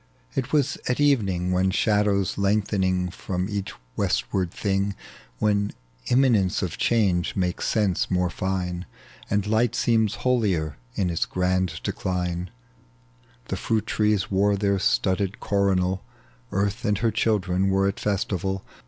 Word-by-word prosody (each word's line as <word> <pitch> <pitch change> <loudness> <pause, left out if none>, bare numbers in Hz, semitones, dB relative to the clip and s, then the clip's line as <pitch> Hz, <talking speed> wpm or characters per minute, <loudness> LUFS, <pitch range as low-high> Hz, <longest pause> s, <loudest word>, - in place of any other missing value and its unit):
It 130 - -2
was 145 -2 +1
at 125 - 0
evening, 100 -11 +2
When 95 +1 +2
shadows 100 -1 +2
lengthen 100 -3 +1
from 90 0 -3
each 100 -2 -3 0.2
westward 95 -3 0
thing, 100 +2 -1 0.4
When 100 - +1 0.3
imminence 120 -9 +3
of 90 - -4
change 100 -6 +2
makes 90 -2 -1
sense 105 -5 +1
more 90 -1 +1
iine. 90 -1 -2 0.4
And 100 -1 +1
light 110 +2 +2
seems 110 -2 +2
holier 95 - +1 0.2
in 90 -3 0
its 85 - 0
grand 95 0 0
decline. 90 -1 -2 1.0
The - - -1
fhiit 110 -2 -1
trees 105 -3 +1
wore 100 +1 +3
their 100 -1 +1
studded 95 +5 +1
coronal, 95 -2 +1 0.5
Earth 100 +2 -1
and 105 -1 +1
her 115 +2 +1
children 95 -4 +1
were 95 0 +2
at 100 - -2
festival. 95 -1 -1
95 Hz, 130 wpm, -25 LUFS, 90-105 Hz, 1.0 s, imminence